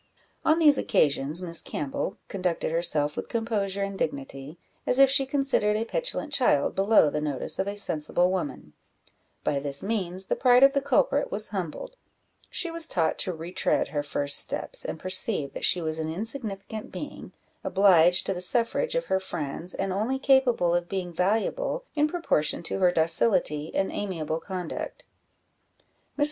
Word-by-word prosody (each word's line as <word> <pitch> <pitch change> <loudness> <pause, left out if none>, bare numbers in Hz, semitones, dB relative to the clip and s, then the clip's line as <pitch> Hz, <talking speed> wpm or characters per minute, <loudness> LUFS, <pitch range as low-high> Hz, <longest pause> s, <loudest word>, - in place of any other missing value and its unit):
On 315 - +3
these 300 -4 +6
occasions 150 +4 +1
Miss 170 -2 -1
Campbell 140 -2 -4
conducted 180 -4 -2
herself 160 -3 +1
with - - -6
composure 205 -4 -2
and 195 0 -5
dignity, 140 +1 -5 0.3
as 250 - +3
if 275 -1 +6
she 270 0 +2
considered 270 -7 +1
a 225 - -2
petulant 320 - -3
child 250 - +2
below 195 -6 +4
the 150 - -2
notice 145 -3 -1
of 195 - 0
a 200 0 -4
sensible 175 -1 +1
woman: 145 - -4 0.7
by 140 - 0
this 140 0 +2
means 190 -3 -1
the - - -1
pride 250 0 +5
of 275 0 +6
the 280 - +1
culprit 390 - +1
was - - -4
humbled; - - -6 0.5
she 340 - -1
was 330 -1 +1
taught 165 - 0
to 185 - 0
retread 170 +2 -1
her 145 - -2
first 145 0 +1
steps, - - +2
and - - -4
perceive 185 -4 0
that - - -2
she 175 - +3
was 160 0 -2
an 160 0 -3
insignificant 215 +1 -4
being, - - -8 0.3
obliged 180 -3 +4
to - - -1
the 180 - -5
suffrage 235 - 0
of - - 0
her 190 - 0
friends, 175 -1 -5
and 195 -1 -2
only 220 +7 -1
capable 260 -10 +3
of 175 0 -1
being 185 -3 -4
valuable 225 - -1
in 300 -1 +2
proportion 300 - -1
to 185 - -3
her 180 -1 +4
docility 165 -2 +1
and 195 - 0
amiable 165 -6 -3
conduct. 180 -2 -6 1.1
Mrs. - - -11
190 Hz, 165 wpm, -26 LUFS, 160-235 Hz, 1.1 s, these